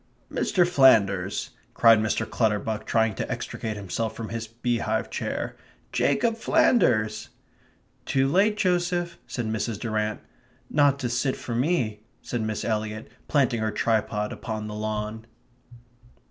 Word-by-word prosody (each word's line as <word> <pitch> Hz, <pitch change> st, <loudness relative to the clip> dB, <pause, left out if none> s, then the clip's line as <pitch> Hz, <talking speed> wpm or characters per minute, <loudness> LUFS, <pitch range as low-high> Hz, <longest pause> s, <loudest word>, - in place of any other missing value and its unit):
"Mr. 180 Hz, -2 st, +2 dB
Flanders!" 100 Hz, -, +3 dB, 0.2 s
cried 115 Hz, -2 st, +6 dB
Mr. 110 Hz, 0 st, 0 dB
Clutterbuck, 110 Hz, -1 st, -1 dB
trying 110 Hz, -1 st, +2 dB
to -, -, -4 dB
extricate 110 Hz, -2 st, -4 dB
himself 105 Hz, +3 st, -3 dB
from 115 Hz, -1 st, -6 dB
his 115 Hz, -1 st, -4 dB
beehive 115 Hz, -1 st, -1 dB
chair. -, -, -3 dB, 0.4 s
"Jacob 225 Hz, +11 st, +1 dB
Flanders!" 110 Hz, -, +2 dB, 0.8 s
"Too 135 Hz, 0 st, +2 dB
late, 200 Hz, +8 st, +3 dB
Joseph," 175 Hz, -3 st, 0 dB
said 120 Hz, -, -3 dB
Mrs. 110 Hz, -1 st, -2 dB
Durrant. 110 Hz, -2 st, -1 dB, 0.5 s
"Not 145 Hz, -2 st, +4 dB
to 125 Hz, -, 0 dB
sit 125 Hz, +3 st, 0 dB
for 120 Hz, -, -6 dB
me," 120 Hz, -5 st, 0 dB, 0.2 s
said 120 Hz, -, -3 dB
Miss 110 Hz, -1 st, -2 dB
Eliot, 110 Hz, -1 st, -2 dB, 0.2 s
planting 135 Hz, -5 st, +2 dB
her 110 Hz, -, +1 dB
tripod 105 Hz, -1 st, 0 dB
upon 110 Hz, -3 st, -5 dB
the 105 Hz, -, -6 dB
lawn. 110 Hz, +1 st, -4 dB
110 Hz, 130 wpm, -26 LUFS, 110-135 Hz, 0.8 s, cried